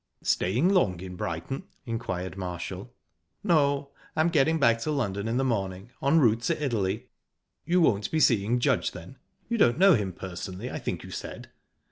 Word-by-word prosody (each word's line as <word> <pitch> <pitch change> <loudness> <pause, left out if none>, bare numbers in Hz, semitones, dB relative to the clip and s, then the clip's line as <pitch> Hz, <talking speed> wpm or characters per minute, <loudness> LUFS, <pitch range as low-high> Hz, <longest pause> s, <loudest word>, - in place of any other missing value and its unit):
"Staying 120 - +2
long 135 - +2
in 90 0 -7
Brighton?" 85 +10 -4 0.2
inquired 95 -7 -4
Marshall. 90 -3 -5 0.5
"No, 140 -4 +2 0.2
I'm 160 +2 +3
getting 160 0 +3
back 115 -4 +4
to 115 - -3
London 110 -8 -1
in 115 +2 0
the 135 - +2
morning, 100 -3 -2
en 140 +4 +3
route 115 -5 +3
to - - 0
Italy." 110 -4 -1 0.6
"You 180 +1 +3
won't 105 -10 +2
be 160 - 0
seeing 115 -4 +3
Judge, - - +1
then? - - -11 0.3
You 235 -1 -1
don't 120 -8 +4
know 195 +2 +7
him 105 -8 0
personally, 95 +5 -6
I - - -4
think - - -4
you - - -10
said." - - -7
115 Hz, 170 wpm, -27 LUFS, 95-140 Hz, 0.6 s, know